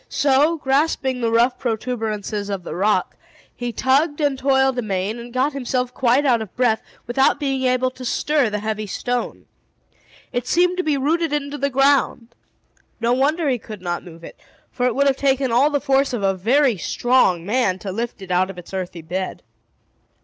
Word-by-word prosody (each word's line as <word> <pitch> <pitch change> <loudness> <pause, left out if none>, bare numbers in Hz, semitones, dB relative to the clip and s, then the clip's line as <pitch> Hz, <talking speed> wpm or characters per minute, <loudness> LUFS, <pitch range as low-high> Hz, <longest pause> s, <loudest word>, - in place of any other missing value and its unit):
So, 290 +4 +2
grasping 270 -2 0
the 230 -1 0
rough 235 +2 +2
protuberances 220 -3 -3
of 195 -3 -3
the 170 - -6
rock, 200 +5 0 0.4
he 245 -1 -4
tugged 285 +6 +1
and 290 -2 +1
toiled 265 -1 +2
amain, 205 0 -2
and 240 +1 -9
got 260 +4 0
himself 250 -2 -2
quite 260 +3 +2
out 240 -4 +3
of 215 -4 -8
breath, 240 -3 +2 0.2
without 265 +4 +2
being 270 -3 -1
able 255 0 +1
to 255 0 -11
stir 285 0 +1
the 210 - -2
heavy 215 0 -3
stone. 245 +5 -3 0.9
It 245 0 -2
seemed 360 +4 +2
to 365 - 0
be 300 -4 +1
rooted 320 +4 0
into 290 0 -3
the 280 - 0
ground. 270 -3 +2 0.7
No 235 +1 +1
wonder 295 +5 +1
he 255 -3 +1
could 210 -3 -10
not 175 -1 -3
move 170 -2 -13
it; - - -11 0.3
for 250 -1 0
it 245 - -1
would 280 +1 +2
have 275 -1 +2
taken 270 -2 +1
all 255 +6 +4
the 290 -1 0
force 275 -1 +1
of 225 -4 -2
a 195 0 +2
very 240 +5 +2
strong 190 -4 +2
man 205 -3 +1
to 190 0 -6
lift 225 0 -4
it 185 - -8
out 185 +1 +2
of 195 - -8
its 180 +2 -11
earthy 180 -3 -5
bed. 185 +3 -4
250 Hz, 190 wpm, -21 LUFS, 215-275 Hz, 0.9 s, all